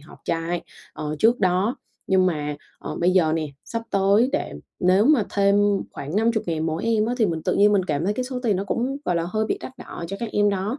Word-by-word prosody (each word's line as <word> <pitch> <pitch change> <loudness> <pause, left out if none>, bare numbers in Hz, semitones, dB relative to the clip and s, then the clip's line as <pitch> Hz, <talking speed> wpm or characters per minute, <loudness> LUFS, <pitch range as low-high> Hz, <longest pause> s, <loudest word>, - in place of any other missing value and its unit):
họp 150 - -15
trại, 170 +1 -2 0.3
ờ, 150 0 -4
trước 235 +2 +3
đó 190 +7 +2 0.3
nhưng 190 -1 +3
mà, 150 -4 -2 0.2
ờ, - - -6
bây 175 - +4
giờ 175 -4 +3
nè, 160 -1 -1 0.2
sắp 230 0 -4
tới 200 +5 +3
để - - -2 0.3
nếu 185 +3 +4
mà 285 -9 +4
thêm 200 0 +3 0.4
khoảng 150 +7 -5
50 225 0 +2
ngàn 160 -1 -1
mỗi 160 +1 -2
em 225 -1 +2
á 245 - -1
thì 220 - +4
mình 165 -3 -3
tự - - 0
nhiên 205 +1 +5
mình 200 -2 +3
cảm 150 -1 -1
thấy 205 +3 0
cái 250 +3 -2
số 250 -1 -4
tiền 215 -6 +2
nó 195 - -2
cũng, 250 +7 -1
gọi 175 - 0
là, 170 - 0
hơi 215 +2 0
bị - - -1
đắt 260 - -9
đỏ - - -8
cho 195 - -4
các 235 - -2
em 205 0 +3
đó 200 +7 -2
195 Hz, 250 wpm, -23 LUFS, 170-220 Hz, 0.4 s, nhiên